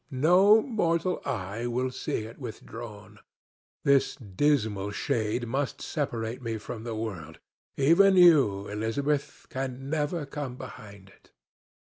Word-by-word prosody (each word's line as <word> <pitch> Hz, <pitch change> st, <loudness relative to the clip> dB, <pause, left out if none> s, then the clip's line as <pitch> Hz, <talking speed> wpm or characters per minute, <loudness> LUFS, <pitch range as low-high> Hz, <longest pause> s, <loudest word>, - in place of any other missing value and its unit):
No 180 Hz, +11 st, +5 dB
mortal 180 Hz, -7 st, 0 dB
eye 105 Hz, +4 st, -3 dB
will 125 Hz, +2 st, -1 dB
see 110 Hz, -, -3 dB
it 115 Hz, +5 st, -11 dB
withdrawn. 110 Hz, -3 st, -9 dB, 0.6 s
This 140 Hz, -1 st, +3 dB
dismal 110 Hz, -3 st, 0 dB
shade 110 Hz, +3 st, -1 dB
must 135 Hz, +4 st, -2 dB
separate 120 Hz, -6 st, -3 dB
me 115 Hz, -2 st, -3 dB
from 110 Hz, +1 st, -7 dB
the 115 Hz, -2 st, -4 dB
world; 90 Hz, -8 st, -5 dB, 0.4 s
even 170 Hz, +8 st, +5 dB
you, 140 Hz, -, +5 dB
Elizabeth, 135 Hz, +8 st, -2 dB
can 135 Hz, +1 st, -4 dB
never 155 Hz, 0 st, -1 dB
come 140 Hz, -3 st, -5 dB
behind 100 Hz, -6 st, -11 dB
it." 95 Hz, -, -23 dB
125 Hz, 120 wpm, -28 LUFS, 110-145 Hz, 0.6 s, No